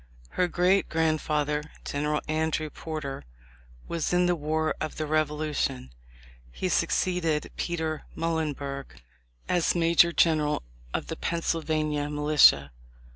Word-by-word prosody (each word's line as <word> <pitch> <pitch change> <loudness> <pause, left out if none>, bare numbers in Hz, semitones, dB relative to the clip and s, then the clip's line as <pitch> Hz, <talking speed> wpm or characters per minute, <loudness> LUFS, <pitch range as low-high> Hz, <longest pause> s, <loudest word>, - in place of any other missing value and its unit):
Her 180 - +1
great 180 +3 +2
grandfather, 150 -2 0 0.2
General 150 +1 -1
Andrew 155 0 -1
Porter, 155 - -5 0.6
was 170 -2 -2
in 180 0 +3
the 175 0 +2
war 155 0 0
of 155 - -3
the 155 - -2
Revolution. 150 - -1 0.6
He - - -3
suc - - +2
ceeded 165 -5 0
Peter 160 -3 -2
Muhlenberg 145 -4 -3 0.5
as 175 -1 +2
major 170 0 +5
general 155 - +2 0.3
of - - -2
the - - -5
Pennsylvania 155 -3 -1
militia. 150 - +5
155 Hz, 115 wpm, -27 LUFS, 150-165 Hz, 0.6 s, major